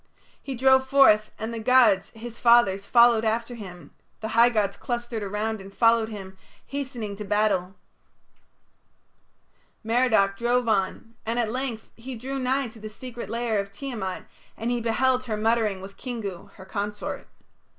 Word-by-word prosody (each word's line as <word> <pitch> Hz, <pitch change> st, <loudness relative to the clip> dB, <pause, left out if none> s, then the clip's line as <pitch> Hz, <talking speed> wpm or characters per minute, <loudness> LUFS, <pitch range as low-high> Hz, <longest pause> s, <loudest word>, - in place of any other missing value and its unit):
He 270 Hz, -, -5 dB
drove 265 Hz, +1 st, +4 dB
forth, 240 Hz, -6 st, +5 dB
and 220 Hz, +2 st, -4 dB
the 230 Hz, -, -4 dB
gods, 225 Hz, -5 st, +4 dB
his 230 Hz, +1 st, -9 dB
fathers, 235 Hz, -5 st, +4 dB
followed 235 Hz, -2 st, +5 dB
after 230 Hz, +2 st, -1 dB
him: 185 Hz, -6 st, -10 dB, 0.3 s
the 220 Hz, -, -4 dB
high 230 Hz, +2 st, +5 dB
gods 205 Hz, -4 st, 0 dB
clustered 240 Hz, -2 st, -4 dB
around 210 Hz, +1 st, -3 dB
and 195 Hz, +1 st, -11 dB
followed 230 Hz, +1 st, +3 dB
him, 190 Hz, -3 st, -9 dB, 0.3 s
hastening 255 Hz, -7 st, -5 dB
to 210 Hz, -, -5 dB
battle. 205 Hz, -3 st, 0 dB, 2.1 s
Merodach 220 Hz, -4 st, +2 dB
drove 240 Hz, +1 st, +1 dB
on, 220 Hz, +2 st, -1 dB
and 230 Hz, +2 st, -2 dB
at 230 Hz, -3 st, 0 dB
length 250 Hz, -3 st, -4 dB
he 250 Hz, +2 st, -8 dB
drew 265 Hz, +4 st, -4 dB
nigh 260 Hz, 0 st, 0 dB
to 220 Hz, -, -14 dB
the 215 Hz, 0 st, -7 dB
secret 240 Hz, +2 st, -8 dB
lair 230 Hz, -2 st, -1 dB
of 200 Hz, 0 st, -4 dB
Tiamat, 205 Hz, -5 st, -5 dB, 0.3 s
and 230 Hz, +2 st, -2 dB
he 240 Hz, -1 st, -1 dB
beheld 255 Hz, +3 st, +1 dB
her 220 Hz, -3 st, -2 dB
muttering 215 Hz, -3 st, +1 dB
with 195 Hz, +1 st, -11 dB
Kingu, 215 Hz, -8 st, -6 dB
her 190 Hz, -, -13 dB
consort. 205 Hz, +1 st, -4 dB
225 Hz, 155 wpm, -25 LUFS, 205-245 Hz, 2.1 s, forth